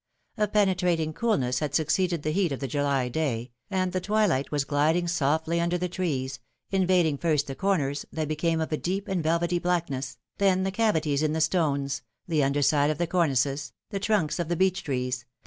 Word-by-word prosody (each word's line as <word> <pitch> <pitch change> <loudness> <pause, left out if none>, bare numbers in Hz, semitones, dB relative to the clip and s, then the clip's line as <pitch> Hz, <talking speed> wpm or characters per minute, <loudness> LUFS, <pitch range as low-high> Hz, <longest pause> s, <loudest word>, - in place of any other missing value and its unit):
A 210 - +1
penetrating 180 -6 +1
coolness 135 - 0
had 145 -2 -2
suc 160 - +2
ceeded 175 -5 +1
the 155 - 0
heat 180 -1 +1
of 135 - -3
the 135 - -3
July 140 -1 0
day, 125 -3 -2 0.2
and 185 -2 0
the 185 - 0
twilight 205 -9 +1
was 145 -2 0
gliding 155 +5 +1
softly 160 +1 +1
under 170 +1 +1
the 180 +1 -1
trees, 140 -8 -2 0.3
invading 180 -6 +2
first 155 -4 +1
the 135 - -5
corners, 145 -5 0
that 155 -1 -2
became 160 +2 0
of 160 - -3
a 155 - +1
deep 195 +5 -3
and 190 -3 -1
velvety 170 +2 +1
blackness, 165 -8 -2 0.2
then 190 -2 +3
the 190 - -1
cavities 160 -10 +1
in 155 -1 +1
the 160 - -1
stones, 140 -5 +1 0.3
the 155 -4 +2
underside 145 +1 +2
of 155 - -1
the 175 - 0
cornices, 145 -5 0 0.2
the 200 - -2
trunks 195 -6 0
of 170 - -1
the 175 - +1
beech 190 +1 +1
trees, 125 -2 -2
the. 125 - -20
160 Hz, 200 wpm, -27 LUFS, 140-180 Hz, 0.3 s, then